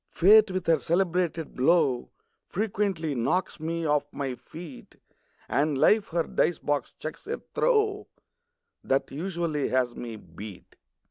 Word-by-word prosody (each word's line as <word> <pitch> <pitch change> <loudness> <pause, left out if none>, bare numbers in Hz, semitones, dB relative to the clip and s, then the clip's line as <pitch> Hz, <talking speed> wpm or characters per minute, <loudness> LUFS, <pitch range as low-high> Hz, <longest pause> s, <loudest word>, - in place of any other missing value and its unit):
Fate 210 +4 +6
with 185 -1 -3
her 165 -2 +4
celebrated 170 0 0
blow 135 -2 +2 0.4
Frequently 195 -6 -1
knocks 150 +10 -1
me 165 +1 -2
off 150 -1 +1
my 135 -2 -3
feet; 145 +4 -11 0.5
And 145 0 +1
Life 210 +8 +4
her 170 0 0
dice 175 - +1
box 145 -3 -2
chucks 155 - -7
a 460 - -3
throw 425 -4 +2 0.8
That 135 +1 0
usually 165 -1 -2
has 125 -2 0
me 115 -2 -6
beat. 100 +1 -11
160 Hz, 130 wpm, -27 LUFS, 135-185 Hz, 0.8 s, Fate